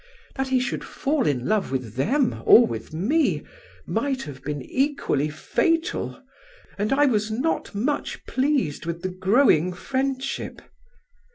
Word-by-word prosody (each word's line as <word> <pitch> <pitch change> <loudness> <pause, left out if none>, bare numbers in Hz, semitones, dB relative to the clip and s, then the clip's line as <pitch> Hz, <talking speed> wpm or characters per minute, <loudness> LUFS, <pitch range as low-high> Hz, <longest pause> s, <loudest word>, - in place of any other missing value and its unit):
That 270 -1 -1
he 260 -1 +2
should 255 - -2
fall 290 -2 -1
in 125 -4 0
love 215 -8 0
with 125 -5 -3
them 240 - +1
or 240 - +9
with 110 -1 -6
me, 245 - +1 0.4
might 270 -2 -1
have 140 -3 -9
been 145 -2 -4
equally 265 - 0
fatal, 330 - -1 0.5
and 210 +2 -1
I 285 +2 +4
was 215 -5 +1
not 250 +1 -1
much 260 +9 -2
pleased 260 - 0
with 170 0 -4
the 185 - -1
growing 185 - +3
friendship. 270 +6 -3
230 Hz, 140 wpm, -24 LUFS, -, 0.5 s, or